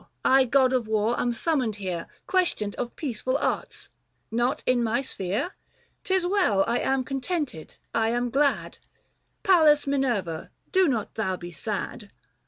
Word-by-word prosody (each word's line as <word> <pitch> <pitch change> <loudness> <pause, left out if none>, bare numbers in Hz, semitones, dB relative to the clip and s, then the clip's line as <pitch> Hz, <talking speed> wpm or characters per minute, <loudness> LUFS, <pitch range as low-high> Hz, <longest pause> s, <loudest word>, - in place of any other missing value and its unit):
I, 265 0 +6
god 260 +1 +3
of 245 -4 0
war, 220 +2 +1
am 245 - +1
summoned 250 -4 0
here 185 -4 -4 0.2
Questioned 355 - 0
of 240 -1 -4
peaceful 255 -2 -2
arts; - - -3 0.4
not 240 +3 0
in 250 -1 +3
my 235 +4 0
sphere? 220 - -3 0.5
'Tis 375 -1 +1
well 355 - +3
— - - -11
I 235 +1 +1
am 265 -1 +1
cod 270 +1 -4
tented, 290 - -3 0.2
I 225 -1 +2
am 240 +1 0
glad: 250 -11 +1 0.6
Pallas 315 -7 +5
Minerva 240 - -1 0.2
do 375 -1 +4
not 230 -7 -1
thou 190 -4 -1
be 175 0 -8
sad! 205 +4 -4
245 Hz, 155 wpm, -26 LUFS, 215-280 Hz, 0.6 s, I